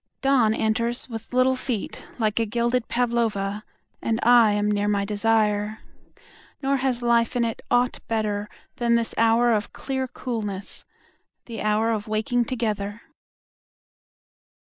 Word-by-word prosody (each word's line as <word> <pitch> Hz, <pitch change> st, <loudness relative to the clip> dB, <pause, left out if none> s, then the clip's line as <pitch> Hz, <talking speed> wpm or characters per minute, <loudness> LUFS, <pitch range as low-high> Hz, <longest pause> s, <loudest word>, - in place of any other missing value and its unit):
Dawn 255 Hz, -6 st, +3 dB
enters 230 Hz, +2 st, 0 dB
with 225 Hz, -3 st, -8 dB
little 255 Hz, +1 st, +3 dB
feetlike 225 Hz, -2 st, -3 dB
a 230 Hz, -, +2 dB
gilded 235 Hz, +2 st, 0 dB
Pavlova, 225 Hz, -4 st, 0 dB, 0.4 s
And 225 Hz, 0 st, 0 dB
I 235 Hz, -2 st, +6 dB
am 210 Hz, 0 st, +1 dB
near 205 Hz, 0 st, 0 dB
my 200 Hz, -1 st, +1 dB
desire. 210 Hz, 0 st, +1 dB, 0.8 s
Nor 275 Hz, 0 st, +1 dB
has 255 Hz, -2 st, -1 dB
life 235 Hz, 0 st, +2 dB
in 240 Hz, -1 st, +2 dB
it 230 Hz, -, -4 dB
aught 245 Hz, +1 st, +2 dB
betterThan 220 Hz, +2 st, -2 dB
this 230 Hz, -1 st, -2 dB
hour 230 Hz, +1 st, +4 dB
of 210 Hz, -1 st, -2 dB
clear 265 Hz, -1 st, -3 dB
coolness, 210 Hz, -6 st, -5 dB, 0.6 s
the 230 Hz, -2 st, -6 dB
hour 215 Hz, +2 st, +2 dB
of 215 Hz, -1 st, -2 dB
waking 220 Hz, +3 st, 0 dB
together. 215 Hz, -3 st, -3 dB
225 Hz, 125 wpm, -24 LUFS, 210-240 Hz, 0.8 s, I